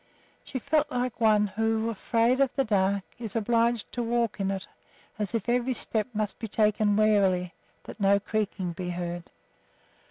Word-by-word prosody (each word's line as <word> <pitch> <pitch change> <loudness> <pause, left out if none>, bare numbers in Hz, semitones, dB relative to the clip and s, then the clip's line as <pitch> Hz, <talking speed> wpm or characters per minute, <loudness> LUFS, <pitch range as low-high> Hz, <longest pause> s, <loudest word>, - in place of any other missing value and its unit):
She 265 - -5
felt 295 +4 +1
like 245 -3 -2
one 215 -2 +5
who, 225 +2 0
afraid 230 +4 +1
of 275 -1 +4
the 270 - +2
dark, 200 -2 +1 0.2
is 225 -3 -5
obliged 230 +1 +1
to 245 - -3
walk 235 -2 0
in 195 -1 0
it; 195 -1 -3 0.5
as 210 +2 -2
if 230 - -2
every 245 +1 +1
step 220 -1 -2
must 215 -2 -3
be 225 - -4
taken 210 -1 +2
warily, 195 -4 +3 0.3
that - - -10
no 200 0 +4
creaking 205 -4 -2
be 180 +1 -5
heard. 175 -1 -4
215 Hz, 165 wpm, -27 LUFS, 195-235 Hz, 0.5 s, one